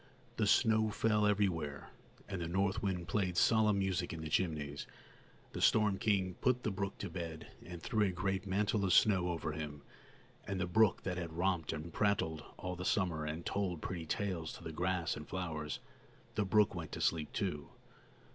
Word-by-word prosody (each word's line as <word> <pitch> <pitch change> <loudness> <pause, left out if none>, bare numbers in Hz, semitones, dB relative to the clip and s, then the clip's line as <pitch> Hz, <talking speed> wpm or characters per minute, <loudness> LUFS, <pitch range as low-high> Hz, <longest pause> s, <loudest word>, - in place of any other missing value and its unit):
The 105 - +2
snow 110 0 +4
fell 105 0 +2
everywhere, 85 -9 0 0.4
and 95 - -4
the 85 - -2
north 95 +4 +1
wind 90 -4 -2
played 90 0 0
solemn 110 -1 +4
music 95 -2 0
in 80 - -5
the 80 - -4
chimneys. 75 -4 -1 0.6
The - - -5
storm 105 -3 +4
king 95 -4 +1
put 125 -1 +2
the 105 - 0
brook 95 0 -3
to 100 - -4
bed, 80 -3 -6
and 85 -1 -9
threw 105 -1 +2
a - - 0
great 95 +2 -2
mantle 100 +2 +1
of 95 -2 +3
snow 90 -4 +5
over 85 -2 -2
him; 75 -1 -6 0.6
and 100 -2 -2
the 90 - +1
brook 105 +3 +3
that 90 -1 -2
had 85 -2 -5
romped 85 -2 0
and 75 +2 -6
prattled 80 -7 +1
all 90 -1 -4
the 90 - -5
summer 90 -6 +1
and 80 +3 -4
told 90 -5 -1
pretty 85 -3 -4
tales 90 -4 -2
to - - -10
the 80 - -5
grass 90 -1 0
and 75 - -8
flowers, 80 -5 -3 0.6
the 105 - 0
brook 105 +2 +4
went 85 -4 -6
to - - -4
sleep 80 -2 +1
too. 75 -8 -2
90 Hz, 185 wpm, -35 LUFS, 80-100 Hz, 0.6 s, snow